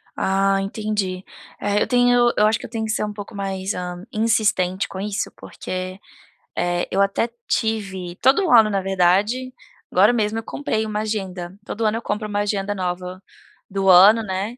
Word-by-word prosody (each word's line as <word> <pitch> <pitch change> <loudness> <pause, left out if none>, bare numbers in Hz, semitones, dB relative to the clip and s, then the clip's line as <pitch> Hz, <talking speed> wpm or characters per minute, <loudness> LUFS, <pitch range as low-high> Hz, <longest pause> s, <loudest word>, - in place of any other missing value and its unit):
Ah, 195 0 +1
entendi. 195 -2 -3 0.4
É 205 0 0
eu - - +1
tenho 245 -1 +4
eu 210 - +5
acho 220 +1 +1
que - - -8
eu - - -9
tenho 225 -2 -3
que 215 - -2
ser 220 - -1
um 210 0 -3
pouco 205 +1 -9
mais, 195 0 -3
hã, 180 +1 -6
insistente 215 -4 +1
com 190 - -8
isso 205 +1 -3
porque, 185 +1 -6 0.6
eh, 175 0 -1
eu 195 - +2
até 200 +4 +1 0.2
tive 195 -5 -2
todo 285 - +4
ano, 220 -3 +7
na 195 -2 0
verdade, 195 +7 +1 0.4
agora 205 +6 +5
mesmo 220 -1 0
eu - - -8
comprei 220 -6 -2
uma 215 -1 -3
agenda. 190 -4 -4
Todo 225 +1 -3
ano 215 +1 +1
eu 230 - -5
compro 210 0 -3
uma 205 0 -2
agenda 205 0 -1
nova, 180 0 -4 0.5
do 195 0 0
ano, 200 +5 +8
né. 200 +4 -4
205 Hz, 180 wpm, -21 LUFS, 190-220 Hz, 0.6 s, ano